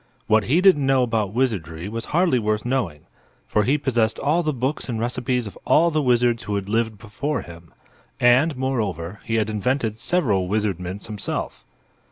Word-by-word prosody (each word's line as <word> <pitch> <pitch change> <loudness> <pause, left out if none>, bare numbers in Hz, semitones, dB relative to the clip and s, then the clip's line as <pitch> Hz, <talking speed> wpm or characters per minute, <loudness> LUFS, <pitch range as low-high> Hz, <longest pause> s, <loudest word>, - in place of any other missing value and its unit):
What 110 -1 +3
he 155 +8 +3
didn't 180 -8 +5
know 135 -1 +4
about 110 -5 0
wizardry 95 - -2
was 115 +2 -5
hardly 170 -5 +2
worth 105 0 -1
knowing, 120 - -1 0.5
for 105 - +2
he 140 +4 +3
possessed 120 -6 0
all 155 +5 +1
the 155 -2 0
books 135 +1 -2
and 115 -2 -2
recipes 125 +1 -1
of 100 - -8
all 170 +2 +4
the 155 -1 +1
wizards 120 -2 +2
who 105 -4 -3
had 100 -1 -3
lived 110 0 0
before 115 +6 -3
him; 85 -1 -13 0.5
and, 125 +5 +4
moreover, 105 -8 -2
he 115 - -1
had 110 -2 +1
invented 110 +1 -1
several 115 - +1
wizardments 100 -2 -2
himself. 105 -3 -4
115 Hz, 175 wpm, -23 LUFS, 105-130 Hz, 0.5 s, didn't